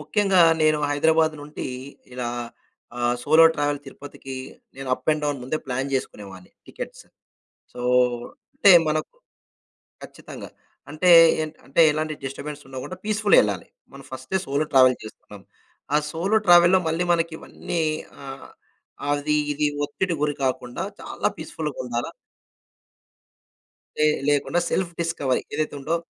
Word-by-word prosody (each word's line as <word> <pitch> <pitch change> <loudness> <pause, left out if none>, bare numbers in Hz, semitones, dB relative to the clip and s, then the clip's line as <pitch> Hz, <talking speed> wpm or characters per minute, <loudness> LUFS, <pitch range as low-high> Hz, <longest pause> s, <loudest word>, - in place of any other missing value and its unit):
ముఖ్యంగా 190 +5 +2 0.2
నేను 155 -1 +3
హైదరాబాద్ 160 +2 +2
నుండి 150 -1 -6 0.5
ఇలా 125 -1 -3 0.7
ఆహ్, 120 0 +1
సోలో 155 +5 +6
ట్రావెల్ 145 -1 -1
తిరుపతికి 135 -1 -10 0.4
నేను 135 -1 -7
అప్ - - -12
అండ్ 155 0 -3
డౌన్ 145 -1 -1
ముందే 130 +5 -2
ప్లాన్ 130 +1 -2
చేసుకునేవాడిని 100 -7 -6 0.2
టికెట్స్. - - -9 0.7
సో, 125 - -7 0.7
అంటే, 200 - +6 0.2
మనకు 155 0 -2 0.9
ఖచ్చితంగా. - - -10 0.4
అంటే, 155 +4 +1 0.6
అంటే 140 - +2
ఎలాంటి 155 +1 -2
డిస్టర్బెన్స్ 145 +2 -6
ఉండకుండా 130 +7 -7
పీస్‌ఫుల్‌‌గా 215 -1 +4
ఎళ్ళాలి. - - -3 0.2
మనం - - -12
ఫస్టే 190 - -3
సోలో 140 +3 0
ట్రావెల్ 130 -1 +6
చేస్తున్నాం. 105 -1 -12 0.5
ఆ - - +6
సోలో 190 +7 +1
ట్రావెల్‌లో 175 +1 +7
మళ్ళీ 165 +2 0
మనకి 165 -1 -1
ఇవన్నీ 170 - -4 0.4
ఆహ్, 135 0 -9 0.6
అది 145 +1 0 0.2
ఇది 150 +1 -1 0.2
ఒత్తిడి 175 +5 -2
గురి 150 -1 0
కాకుండా 125 -2 -2 0.2
చాలా - - -2
పీస్‌ఫుల్‌‌గా - - -5
ఉండాల - - -3 1.9
లే 155 - +4 0.2
లేకుండా 145 +4 +1
సెల్ఫ్ 185 -2 -1
డిస్కవరీ 145 -6 -1
ఏదైతే 155 -1 -2
ఉందో 150 +5 -1
150 Hz, 125 wpm, -23 LUFS, 135-165 Hz, 1.9 s, ట్రావెల్‌లో